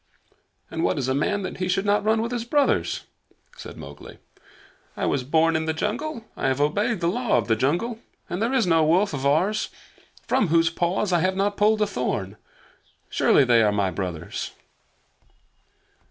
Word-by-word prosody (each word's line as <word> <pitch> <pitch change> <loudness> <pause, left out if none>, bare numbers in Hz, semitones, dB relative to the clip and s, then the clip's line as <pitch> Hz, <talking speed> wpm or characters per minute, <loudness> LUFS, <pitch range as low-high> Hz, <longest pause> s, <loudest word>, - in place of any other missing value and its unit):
"And 165 0 -2
what 180 - +1
is 135 -3 -1
a 130 - +1
man 200 +9 0
that - - -5
he 185 - -2
should 190 +2 0
not 205 0 +2
run 220 +1 +2
with 235 - -4
his 240 -2 -2
brothers?" 280 +4 +1 0.5
said - - -10
Mowgli. - - -11 0.8
"I - - -1
was 135 - 0
born 160 +4 +2
in 160 0 0
the 160 0 -1
jungle. 230 - -3
I - - -1
have 130 +1 0
obeyed 200 +9 0
the 170 - +1
Law 235 - +1
of 110 -4 -1
the 110 - +3
Jungle, 175 - -1 0.3
and 175 +3 -4
there 230 +3 +1
is 260 -4 +2
no 165 -2 +3
wolf 175 +5 +2
of 140 0 -1
ours 185 +9 +1 0.6
from 210 - +2
whose 165 0 +3
paws 180 +3 0
I 175 - +4
have 185 +3 +1
not 200 +1 0
pulled 215 +1 +3
a - - +2
thorn. 105 - -3 0.7
Surely - - +4
they 120 -3 +4
are 105 -1 +3
my 100 -2 0
brothers!" 90 -5 -5
175 Hz, 185 wpm, -24 LUFS, 140-210 Hz, 0.8 s, I